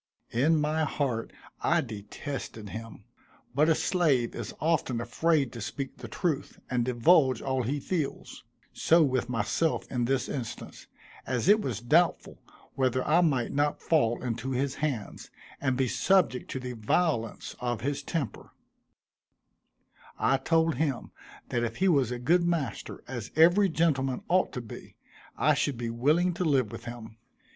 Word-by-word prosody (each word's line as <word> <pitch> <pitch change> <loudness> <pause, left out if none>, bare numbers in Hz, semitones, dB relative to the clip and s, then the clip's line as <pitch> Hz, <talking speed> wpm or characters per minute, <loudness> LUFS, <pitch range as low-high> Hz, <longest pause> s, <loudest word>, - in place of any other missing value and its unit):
In 150 +7 +3
my 155 +1 +1
heart 135 -7 -2 0.3
I - - +3
detested 110 0 -7
him; 115 +1 -8 0.5
but 150 +5 +3
a 160 - +5
slave 150 -12 +1
is 120 - -5
often 150 -6 0
afraid 140 +3 +1
to 115 - -7
speak 135 +5 -5
the 125 - -8
truth, 155 +2 -2
and 125 -1 +1
divulge 130 +1 +4
all 130 -1 -1
he 135 +5 -1
feels; 155 -1 -4 0.3
so 165 0 +4
with 130 -3 0
myself 125 +7 0
in 125 -2 0
this 130 0 0
instance, 125 -5 -6 0.4
as 125 +3 -1
it 210 +2 +6
was 115 - -3
doubtful 165 +8 +2 0.3
whether 130 -1 0
I 160 +4 +5
might 135 -8 +1
not 145 +1 0
fall 120 -8 +1
into 120 +1 -3
his 135 +1 -1
hands, 135 -9 -3 0.3
and 130 -2 +1
be 130 -1 +2
subject 175 -2 +2
to 130 - -3
the 125 -1 -5
violence 115 +1 -1
of 120 -2 -2
his 140 +3 -2
temper, 140 - -4 1.6
I 135 - +2
told 160 +1 +1
him 140 -4 -1 0.4
that 120 -1 0
if 115 -1 -2
he 190 - +1
was 140 -9 +3
a 125 - -3
good 170 +9 +2
master, 170 -8 -2
as 120 -3 -5
every 175 +5 +5
gentleman 140 -6 0
ought 185 +1 +3
to 125 - -4
be, 115 - -11 0.4
I - - +4
should 140 -4 0
be 115 -1 -3
willing 155 +10 +2
to 175 - -2
live 135 -9 +2
with 115 0 -9
him. 115 -2 -8
135 Hz, 155 wpm, -28 LUFS, 120-160 Hz, 1.6 s, it